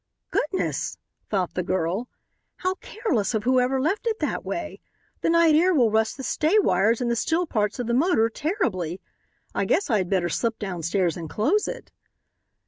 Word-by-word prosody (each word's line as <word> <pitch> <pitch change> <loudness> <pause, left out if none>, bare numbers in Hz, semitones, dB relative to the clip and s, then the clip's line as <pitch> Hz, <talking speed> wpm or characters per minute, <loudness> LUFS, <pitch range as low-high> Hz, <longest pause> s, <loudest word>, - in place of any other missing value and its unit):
"Goodness!" 370 +5 -1 0.3
thought 190 -4 -1
the 180 - -1
girl, 185 +5 -1 0.5
"how 370 0 -1
careless 250 - -1
of 215 - -1
whoever 255 +1 +2
left 375 - 0
it 445 -1 0
that - - -2
way. - - -5 0.4
The - - +1
night 335 -1 +5
air 350 +4 +4
will 240 -6 +4
rust 220 +2 +1
the 265 - -6
stay 315 +9 +2
wires 220 - +3
and 240 -1 0
the - - +1
steel 325 +9 +1
parts 210 -8 -1
of 245 - -3
the 235 - -1
motor 260 -4 +3
terribly. 225 - -2 0.5
I - - 0
guess 395 - +1
I 215 - +3
had 180 -2 -2
better 185 -3 +1
slip 225 +6 -1
downstairs 180 -2 -1
and 165 -2 -6
close 330 - +1
it." - - -7
235 Hz, 180 wpm, -25 LUFS, 195-325 Hz, 0.5 s, night